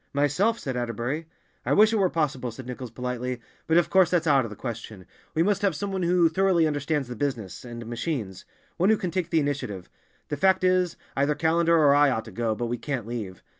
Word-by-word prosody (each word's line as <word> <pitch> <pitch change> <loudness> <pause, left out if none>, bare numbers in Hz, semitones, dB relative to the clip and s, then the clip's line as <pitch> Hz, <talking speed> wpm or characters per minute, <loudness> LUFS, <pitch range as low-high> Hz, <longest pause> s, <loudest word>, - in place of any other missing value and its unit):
"Myself," 145 +11 +2
said 130 - -4
Atterbury. 120 +6 -3 0.4
"I - - +1
wish 215 +2 +5
it - - +2
were 190 -3 +3
possible," 135 -7 -1
said 120 +3 -9
Nichols 125 0 -6
politely. 125 +1 -4 0.3
"But 160 - +4
of 170 -1 +2
course 190 -3 +5
that's 175 -2 +1
out 140 -4 +4
of - - -6
the 105 - -8
question. 110 -6 -7 0.3
We 160 - +3
must 200 +1 +1
have 195 -5 +1
some 200 +4 -3
one 190 -1 -2
who 175 -1 +4
thoroughly 175 0 +2
understands 145 -2 -1
the 125 - -6
business, 115 -7 -3
and 120 -1 -8
the - - -12
machines—one 120 - -3
who 220 - +4
can 180 -3 -3
take 180 -2 -2
the 165 - +3
initiative. 140 -11 -3 0.4
The 145 - -2
fact 190 +4 +3
is, 185 -2 +2 0.2
either 140 +2 +1
Callender 165 +2 +3
or 145 -3 +5
I 145 0 +5
ought 110 -4 -1
to 110 - -10
go, 110 +2 -1
but 120 - -3
we 120 0 -3
can't 130 -4 -3
leave. 110 -6 -6
145 Hz, 225 wpm, -26 LUFS, 120-170 Hz, 0.4 s, wish